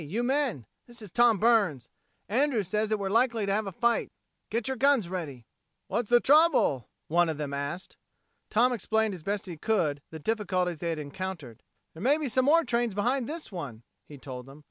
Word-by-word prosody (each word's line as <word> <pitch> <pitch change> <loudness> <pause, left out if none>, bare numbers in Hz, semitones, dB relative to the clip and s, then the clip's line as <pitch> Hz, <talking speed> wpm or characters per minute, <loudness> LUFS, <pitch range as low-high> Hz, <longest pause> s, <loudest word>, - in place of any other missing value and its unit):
you 200 +11 -2
men! 260 - 0 0.2
This 240 -1 -11
is 200 - -10
Tom 235 0 +4
Burns. 200 - +2 0.4
Andrews 235 - +1
says 210 +2 0
that 215 - +1
we're 200 -1 -3
likely 230 -1 +2
to 200 - -1
have 210 0 -1
a - - -4
fight. 235 +5 +1 0.4
Get 225 0 -2
your 265 - -1
guns 270 -7 +3
ready." 150 -10 -5 0.4
"What's 235 -3 -1
the 240 0 +6
trouble?" 275 - +3 0.2
one 170 +1 +3
of 155 - -3
them 145 -2 -4
asked. 140 +6 -5 0.5
Tom 245 +3 +3
explained 220 -1 0
as 180 - -8
best 200 +4 -2
he 175 -4 -7
could 155 -7 0
the 160 - -8
difficulties 185 -3 -1
they 170 - -2
had 165 - -2
encountered. 150 - -6 0.3
"There 160 - -11
may 280 +5 +3
be 300 -4 -3
some 255 +2 +2
more 330 +4 +5
trains 235 -6 -1
behind 245 +4 0
this 320 -4 -6
one," 135 - -7 0.2
he 145 - -11
told 130 -2 -8
them. 135 +2 -13
205 Hz, 200 wpm, -28 LUFS, 160-240 Hz, 0.5 s, the